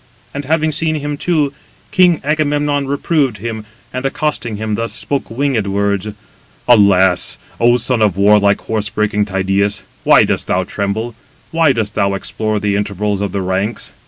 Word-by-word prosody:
And 140 0 -5
having 155 +2 +1
seen 155 +1 +1
him 145 -1 -3
too, 150 -2 0 0.4
king 180 -3 +4
Agamemnon 145 -1 0
reproved 140 -3 0
him, 110 +1 -5 0.3
and 130 0 -3
accosting 135 -5 -2
him 110 0 -3
thus, 115 0 -2
spoke 140 +3 -3
winged 120 -4 -1
words: 100 0 0 0.6
"Alas! 95 -6 +4 0.2
O 120 +1 +4
son 120 -1 0
of 100 -4 +2
warlike 100 0 +4
horse 105 -1 -2
breaking 105 -1 0
Tydeus, 95 +1 0 0.2
why - - +6
dost - - -1
thou 90 +1 +1
tremble? 100 +5 -3 0.4
Why 165 -3 +3
dost 110 -4 -2
thou 100 0 0
explore 110 +2 -2
the 105 -1 0
intervals 105 0 -2
of 100 -2 -2
the 100 - -2
ranks? 95 +4 -3
110 Hz, 160 wpm, -16 LUFS, 100-140 Hz, 0.6 s, why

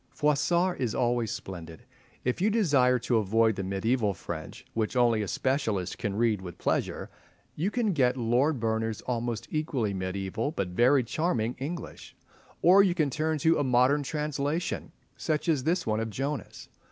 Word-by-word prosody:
Froissart 170 +5 +1
is 120 -5 -1
always 120 -2 +1
splendid. 85 -4 -8 0.4
If 125 +6 -1
you 205 - +3
desire 145 - +3
to 120 0 0
avoid 110 +1 +2
the 100 - -3
mediaeval 100 +2 0
French, - - -7
which 110 +2 -1
only 120 -3 +3
a 105 - -3
specialist 110 -8 -1
can 100 -1 -2
read 110 -3 +1
with 90 -2 -8
pleasure, - - -2 0.4
you 170 +7 0
can 220 -3 0
get 130 -4 +2
Lord 125 +5 +1
Berners' 110 -1 -1
almost 120 -2 -3
equally 135 -9 -1
mediaeval, 95 +7 -3
but 95 - -2
very 125 +8 +4
charming 120 -3 -1
English, 160 +6 -6 0.5
or 185 +3 +8
you 185 -3 +2
can 155 -5 +1
turn 155 +3 0
to 165 0 +4
a - - +2
modern 130 +3 +3
translation, 150 +3 -2 0.3
such 155 0 -1
as 145 -5 +1
this 170 +3 +1
one 110 0 0
of 115 0 -2
Johnes. 135 +2 -4
125 Hz, 165 wpm, -28 LUFS, 110-150 Hz, 0.5 s, or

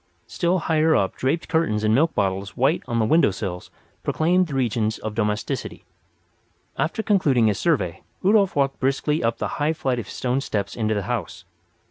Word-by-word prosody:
Still 175 +1 0
higher 160 -2 +2
up 95 - +1
draped 140 +6 -1
curtains 160 -10 0
and 110 0 +3
milk 160 +7 +2
bottles 95 +1 -1
white 135 +7 +2
on 120 -2 -1
the 110 - +2
window 160 +5 +4
sills 95 -2 -5 0.3
proclaimed 180 +3 +2
the 145 - -5
regions 110 -4 0
of 110 - -5
domesticity. 105 -1 -3 0.9
After 175 +7 -1
concluding 150 - +3
his 105 -2 +1
survey 115 - 0 0.2
Rudolf 200 0 +3
walked 135 -1 0
briskly 140 +3 0
up 115 0 0
the - - -2
high 155 +2 +2
flight 135 -7 -1
of 105 - -7
stone 130 +2 -1
steps 100 -7 -3
into 110 -1 0
the 100 - -1
house. 110 -3 -4
130 Hz, 175 wpm, -23 LUFS, 105-160 Hz, 0.9 s, window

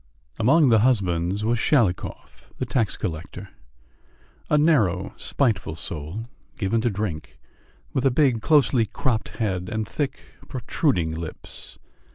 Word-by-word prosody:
Among 140 +6 +5
the 110 -2 +5
husbands 100 -4 +1
was 115 +1 +1
Shalikov, 110 -10 0
the - - -2
tax 115 -6 0
collector 80 -3 -5 1.0
a 150 - +4
narrow, 110 - +2
spiteful 105 - 0
soul, 85 +6 -5 0.3
given 110 0 0
to 120 - +1
drink, 80 - -4 0.6
with 130 +1 +2
a - - +5
big, 130 -4 +2
closely 135 -5 +4
cropped 115 +2 -1
head, 95 -5 -1
and 110 0 -2
thick, 145 +3 -3 0.3
protruding 120 - 0
lips. 80 0 -8
110 Hz, 125 wpm, -24 LUFS, 90-130 Hz, 1.0 s, Among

